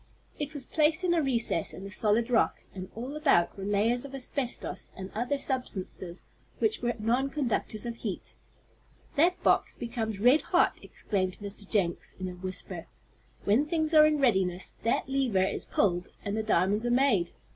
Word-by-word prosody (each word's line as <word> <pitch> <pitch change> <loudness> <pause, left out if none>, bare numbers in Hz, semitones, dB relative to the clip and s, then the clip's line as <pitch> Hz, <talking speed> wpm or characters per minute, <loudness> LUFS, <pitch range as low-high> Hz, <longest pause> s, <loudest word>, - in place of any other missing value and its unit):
It 295 +1 -4
was 275 - -6
placed 315 +2 +2
in 355 -1 +3
a 335 - +3
recess 235 - 0
in 190 - -9
the 195 - -7
solid 225 +4 +1
rock, 230 - +2
and 185 -1 -7
all 250 +6 -5
about 275 - +3
were 195 - -7
layers 215 +4 +2
of 275 -1 -8
asbestos 260 -1 -3
and 190 0 -7
other 245 +6 -1
substances 190 -10 -4 0.4
that 435 -1 +1
were 240 0 +1
nonconductors 240 -1 -1
of 235 -1 -4
heat. 210 -6 -5 0.8
"That 340 +4 +2
box - - +3
becomes 225 -3 -3
red 250 +8 +5
hot," - - +2
exclaimed 185 -3 -2
Mr. 205 -1 -8
Jenks, 180 -5 0
in 185 - -3
a - - -4
whisper. 185 +1 -6 0.6
"When 240 +9 +3
things 315 0 0
are 305 -1 +8
in 305 -1 +2
readiness, 190 -9 +1
that 230 - 0
lever 260 -8 +2
is 190 - -2
pulled 180 -3 +1 0.2
and 200 0 -1
the 220 - 0
diamonds 205 0 +2
are 240 - 0
made. 240 -9 +3
230 Hz, 170 wpm, -29 LUFS, 195-275 Hz, 0.8 s, are